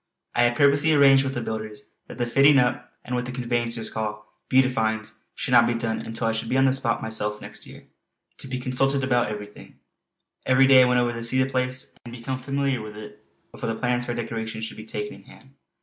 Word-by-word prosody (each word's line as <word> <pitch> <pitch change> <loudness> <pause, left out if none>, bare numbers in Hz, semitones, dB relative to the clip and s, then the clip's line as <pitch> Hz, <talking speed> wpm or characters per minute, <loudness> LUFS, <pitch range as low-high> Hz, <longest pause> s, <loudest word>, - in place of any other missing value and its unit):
I - - +2
had 120 0 +1
purposely 145 +3 +4
arranged 135 -1 +6
with 135 0 -3
the 120 - -2
builders 110 -1 -6 0.2
that - - -10
the 120 - 0
fitting 135 +4 +5
up 125 -1 0
and 125 - -5
what 125 0 -1
the - - -5
conveyancers 120 -2 -2
call 105 -1 -5 0.2
"beautifyings" 110 -4 +1 0.2
should - - -3
not 120 -1 +6
be 120 - 0
done 115 -1 -2
until 115 +1 -4
I 115 - +2
should 115 0 -3
be 130 - +1
on 135 - +4
the 130 - +3
spot 130 -3 -1
myself 105 -1 -2
next - - -11
year, - - -13 0.5
to - - -7
be 130 -1 -3
consulted 130 +2 0
about 125 -3 +2
everything. 105 -1 -9 0.7
Every 130 +1 +4
day 135 -1 +7
I - - +6
went 125 0 +3
over 120 -1 0
to 115 0 -6
see 115 +2 -1
the - - -2
place 130 0 -2
and 120 0 -9
become 130 +2 -5
familiar 140 -2 -1
with 105 0 -9
it 105 0 -11 0.3
before - - -5
the 110 - -5
plans 125 -1 0
for 120 - -2
decoration 110 -1 -4
should 110 - -6
be 110 - -9
taken 105 -1 -5
in 100 - -14
hand. 135 - -17
120 Hz, 225 wpm, -24 LUFS, 110-130 Hz, 0.7 s, day